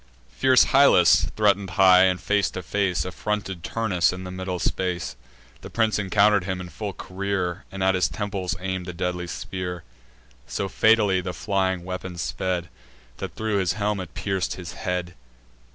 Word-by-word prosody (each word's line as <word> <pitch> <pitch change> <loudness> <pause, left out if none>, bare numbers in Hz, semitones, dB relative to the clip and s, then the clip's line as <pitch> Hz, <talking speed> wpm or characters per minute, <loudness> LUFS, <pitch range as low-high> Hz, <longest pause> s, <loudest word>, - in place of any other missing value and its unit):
Fierce 130 -1 +5
Hyllus 135 - +5
threaten'd 100 -2 +2
high, 95 -1 +7
and, 90 -1 +1
face 105 -2 +1
to 95 - -6
face, 95 +1 0
Affronted 95 -2 -3
Turnus 100 -6 +1
in 90 0 -7
the 90 - -7
middle 95 0 -4
space: 90 -1 -2 0.5
The - - -9
prince 110 -2 +1
encounter'd 100 -1 +3
him 95 -1 -3
in 90 -1 -7
full 100 +5 -5
career, 95 -1 -3
And 95 -1 -4
at 95 0 +4
his 90 -3 +2
temples 100 -1 -3
aim'd 95 -1 -4
the 90 - -5
deadly 90 0 -3
spear; 90 0 -5 0.6
So 100 - -2
fatally 105 -3 +3
the 90 0 -4
flying 95 -3 -1
weapon 90 -1 -6
sped, 90 0 -2 0.5
That - - -6
thro' 110 -2 0
his 90 -3 +1
brazen - - -11
helm 105 -1 0
it 85 -7 -8
pierc'd 95 -2 -2
his 90 -2 -8
head. 90 -3 -3
95 Hz, 170 wpm, -24 LUFS, 90-100 Hz, 0.6 s, high